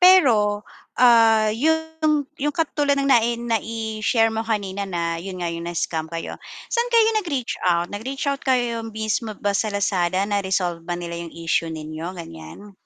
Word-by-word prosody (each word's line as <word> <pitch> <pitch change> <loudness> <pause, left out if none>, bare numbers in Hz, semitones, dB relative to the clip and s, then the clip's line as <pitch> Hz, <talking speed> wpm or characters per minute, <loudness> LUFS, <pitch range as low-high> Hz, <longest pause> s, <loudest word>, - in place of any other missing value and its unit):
Pero, 230 - +5 0.3
ah, 225 -3 +6
yung 315 +3 +1 0.2
yung 295 +2 0
katulad 290 -3 +1
ng 275 - 0
nai 235 -2 +4
nai-share 225 -1 0
mo 220 - -1
kanina 200 -3 -2
na 170 -2 -2
yun 185 +1 -6
nga 175 - -1
yung 170 0 -5
na-scam 160 -2 -2
kayo. 165 0 -5 0.4
Saan 475 0 +1
kayo 460 -2 +5
nag-reach 280 - -3
out? 175 -1 +2
Nag-reach 260 +7 -4
out 280 0 -1
kayo 240 -3 +1
mismo 220 0 -3
ba 205 - -1
sa 215 +2 0
Lazada? 190 -2 +1
Na-resolve 190 -4 -1
ba 175 +1 -3
nila 170 -1 -5
yung 170 -1 -8
issue 165 0 0
ninyo, 160 +3 -6
gan'yan? 85 - -10
215 Hz, 160 wpm, -23 LUFS, 175-250 Hz, 0.4 s, ah